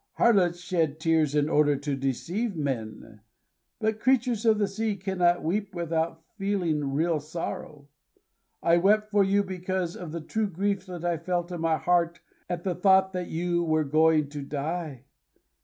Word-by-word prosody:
Harlots 185 -7 +3
shed 165 -4 -1
tears 160 -2 +2
in 145 0 +2
order 150 -2 +3
to 140 0 -3
deceive 170 - -2
men; 115 -7 -4 0.6
but 220 0 0
creatures 245 -2 +1
of 220 -1 +5
the 205 -1 +1
sea 210 +2 -2
cannot 180 -2 +1
weep 195 +4 -2
without 165 -1 -2 0.2
feeling 170 -8 0
real 160 +3 +1
sorrow. 150 -2 -6 0.8
I 170 0 +4
wept 210 +4 +3
for 205 -1 +4
you 200 +1 +2
because 185 -2 -3
of 175 -4 -7
the 170 - -4
true 215 +6 -2
grief 195 +1 -2
that 175 -2 -6
I 170 -1 +1
felt 175 +1 -2
in 175 -2 -4
my 165 -1 +2
heart 170 -1 +1 0.3
at 175 -1 -3
the 185 - 0
thought 190 +1 +4
that 180 -1 -3
you 175 +1 -1
were 155 -1 +2
going 155 0 +3
to 145 0 -6
die. 145 -1 -4
175 Hz, 165 wpm, -27 LUFS, 155-195 Hz, 0.8 s, of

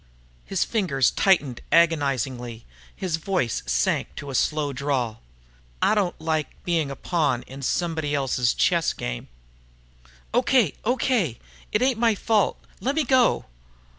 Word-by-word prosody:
His 195 -3 0
fingers 160 - +1
tightened 150 -11 +2
agonizingly, 135 -7 +2
and 115 - -14 0.3
his 180 -4 -2
voice 165 - -1
sank - - 0
to 140 - -6
a - - -7
slow 145 +2 0
drawl. 130 -5 -2 0.6
"I - - +3
don't 200 -4 0
like 160 -1 -2
being 165 -5 0
a 140 - -5
pawn 145 -7 0
in 135 +1 -10
somebody 160 0 -1
else's 125 -4 +1
chess 170 -2 +2
game." - - -5 1.1
"Okay, 245 - +3
okay! 235 - +1 0.3
It 210 - +2
ain't 255 -3 +2
my 230 -2 +3
fault. 210 0 +1 0.2
Lemme 285 +5 +1
go." 255 -2 +3
160 Hz, 135 wpm, -24 LUFS, 135-200 Hz, 1.1 s, I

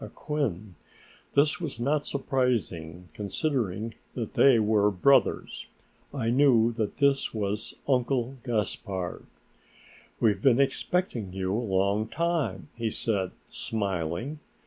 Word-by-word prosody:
Acquin. 110 - -3 0.6
This 150 +4 +3
was 150 -8 -5
not 145 +4 0
surprising, 105 - -1
considering 110 - -2 0.2
that 115 -4 -4
they 135 -3 +6
were 105 -1 +3
brothers. 105 +8 +2 0.4
I 120 -5 -1
knew 120 -3 +5
that 110 -3 -3
this 140 -4 +2
was 105 0 -2
Uncle 130 -1 +1
Gaspard. 100 -5 -3 0.9
"We've 110 -3 +2
been 135 -3 +4
expecting 135 - 0
you 95 0 -2
a 115 - 0
long 100 0 +1
time," 135 - -1
he 115 -1 -1
said, 100 -4 -1 0.2
smiling. 100 - -3
115 Hz, 110 wpm, -27 LUFS, 100-135 Hz, 0.9 s, they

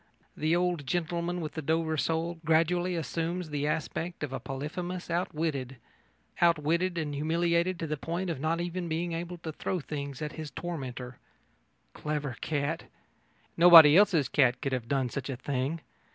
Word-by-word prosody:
The 155 +2 +1
old 175 -5 0
gentleman 175 +1 -1
with 155 - -4
the 160 - -4
Dover 160 +1 0
sole 160 +4 -1
gradually 170 +3 +2
assumes 165 +1 -3
the 145 0 -1
aspect 160 +2 -3
of 140 -2 -4
a 135 - -3
Polyphemus 155 +8 -5
outwitted 155 -6 -2 0.6
outwitted 170 +2 +2
and 150 -3 -2
humiliated 170 +4 +1
to 165 - -3
the 155 -1 -2
point 170 +5 -3
of 160 - -4
not 160 +3 0
even 175 0 -3
being 165 +2 -2
able 170 +1 -4
to 165 -1 -6
throw 180 +4 -3
things 140 -3 -5
after 150 +1 -5
his 155 -2 -5
tormentor. 130 -5 -6 0.7
Clever 150 -4 -3
cat! 150 +1 -2 0.7
Nobody 165 -3 +10
else's 180 -7 +5
cat 130 -3 +3
could 135 - -2
have 125 -3 -2
done 135 -1 0
such 140 +2 -5
a 130 - -3
thing. 140 +4 -2
160 Hz, 160 wpm, -29 LUFS, 145-170 Hz, 0.7 s, Nobody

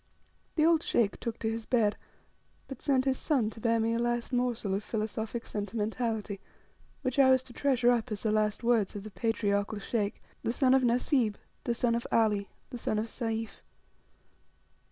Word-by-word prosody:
The 310 - +4
old 330 -1 +5
Sheikh 220 -9 +1
took 235 -1 -4
to 220 - -1
his 225 0 -5
bed, 220 -5 +3 0.7
but 270 -2 -8
sent 270 -3 +2
his 265 -1 +1
son 250 -9 +1
to 225 - -10
bear 230 0 +2
me 225 +1 +1
a 230 - 0
last 240 +1 -1
morsel 245 -5 0
of 200 +2 -1
Philosophic 220 +1 -3
sentimentality, 215 -1 -2 0.6
which 255 +1 -1
I 265 -1 +7
was 260 -1 +5
to 250 - -11
treasure 250 -3 +3
up 240 0 0
as 210 - -3
the 220 - +1
last 215 +1 +1
words 230 -5 +2
of 200 - -5
the 215 - -8
patriarchal 205 -1 0
Sheikh, 205 0 -2 0.2
the - - 0
son 260 0 +4
of 265 - +5
Nasib, 240 -2 +2 0.3
the 235 - 0
son 235 0 +1
of 235 0 -1
Ali, 210 -3 +2 0.2
the 245 - -5
son 215 - -1
of 215 - 0
Sayf. 225 -2 -4
230 Hz, 185 wpm, -30 LUFS, 215-245 Hz, 0.7 s, I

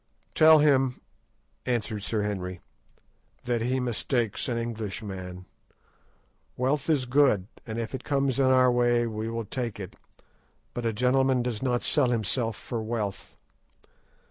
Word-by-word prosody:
"Tell 155 0 +7
him," 135 -4 +3 0.6
answered 110 -3 -2
Sir 105 +1 -1
Henry, 90 -3 -4 0.8
"that 120 -2 -1
he 130 +3 0
mistakes 120 -1 -1
an 120 - -1
Englishman. 100 -5 -5 1.1
Wealth 135 +4 0
is 145 -5 +2
good, 125 -7 +3 0.2
and 110 0 -4
if 115 +1 -4
it 130 - -5
comes 140 -2 0
in 135 - +4
our 130 -1 +5
way 120 -1 +2
we 110 0 -4
will 115 -1 -4
take 120 -1 -4
it; 95 - -8 0.8
but 120 -1 -2
a - - +1
gentleman 125 +2 +2
does 120 -3 -3
not 125 -2 0
sell 145 -5 +4
himself 115 0 0
for 115 -2 -5
wealth. 110 -3 -4
120 Hz, 140 wpm, -27 LUFS, 110-130 Hz, 1.1 s, Tell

